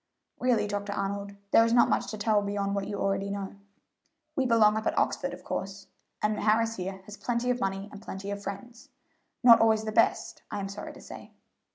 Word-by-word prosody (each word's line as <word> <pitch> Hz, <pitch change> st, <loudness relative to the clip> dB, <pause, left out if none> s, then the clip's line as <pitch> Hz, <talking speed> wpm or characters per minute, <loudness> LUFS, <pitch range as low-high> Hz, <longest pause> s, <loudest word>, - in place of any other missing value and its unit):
"Really, 240 Hz, -4 st, +2 dB
Dr. 205 Hz, 0 st, -3 dB
Arnold, 200 Hz, 0 st, -3 dB, 0.2 s
there 225 Hz, -, +7 dB
is 230 Hz, 0 st, +1 dB
not 240 Hz, -, +6 dB
much -, -, 0 dB
to 215 Hz, -, -5 dB
tell 210 Hz, 0 st, +2 dB
beyond 200 Hz, 0 st, -2 dB
what 200 Hz, -1 st, -2 dB
you 205 Hz, -1 st, -4 dB
already 195 Hz, 0 st, 0 dB
know. 200 Hz, 0 st, -5 dB, 0.8 s
We 265 Hz, -2 st, +1 dB
belong 220 Hz, -3 st, +5 dB
up 220 Hz, 0 st, -2 dB
at -, -, -1 dB
Oxford, -, -, 0 dB
of -, -, -10 dB
course, 195 Hz, 0 st, -5 dB, 0.4 s
and 210 Hz, 0 st, +1 dB
Harris 225 Hz, +1 st, +2 dB
here 190 Hz, +1 st, -5 dB
has 210 Hz, +1 st, -10 dB
plenty 240 Hz, +4 st, -1 dB
of 250 Hz, -, -1 dB
money 195 Hz, +1 st, -2 dB
and 205 Hz, -, -10 dB
plenty 195 Hz, 0 st, -6 dB
of 200 Hz, 0 st, -4 dB
friends 230 Hz, +5 st, -8 dB, 0.5 s
not 230 Hz, -2 st, +8 dB
always 220 Hz, -1 st, +4 dB
the 215 Hz, -, -3 dB
best, 230 Hz, -, +1 dB
I 205 Hz, -, -4 dB
am 195 Hz, 0 st, -4 dB
sorry 200 Hz, +1 st, -7 dB
to -, -, -13 dB
say. -, -, -11 dB
205 Hz, 210 wpm, -28 LUFS, 200-225 Hz, 0.8 s, not